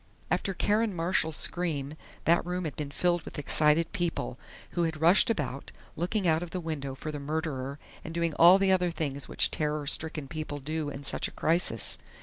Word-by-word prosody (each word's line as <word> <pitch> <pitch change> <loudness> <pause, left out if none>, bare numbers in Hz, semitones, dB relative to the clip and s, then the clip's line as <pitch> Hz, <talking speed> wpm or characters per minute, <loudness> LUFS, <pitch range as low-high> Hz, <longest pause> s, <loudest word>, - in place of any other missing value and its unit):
After 195 - 0
Karen 210 +1 +1
Marshall's 165 -2 +1
scream 155 -6 0 0.3
that 170 +1 +4
room 180 0 -3
had 155 - -4
been 150 -3 -4
filled 175 +3 +1
with - - -10
excited 150 +3 +2
people, 165 -7 -2 0.3
who 175 - -1
had 160 -2 -1
rushed 170 +8 +5
about, 145 - -3 0.2
looking 180 +4 -1
out 160 0 +3
of 175 - -5
the 185 - -4
window 145 -5 -4
for 155 +3 -5
the 150 - -5
murderer 140 -2 -3 0.3
and 160 - -7
doing 170 -1 -1
all 175 +5 +8
the 195 -1 +2
other 180 -1 +3
things 145 -4 -4
which - - +3
terror 150 -1 -1
stricken 155 0 +1
people 155 -1 -5
do 150 +2 -3
in 140 0 -7
such - - -1
a - - -11
crisis. 160 - +1
160 Hz, 190 wpm, -29 LUFS, 145-175 Hz, 0.3 s, all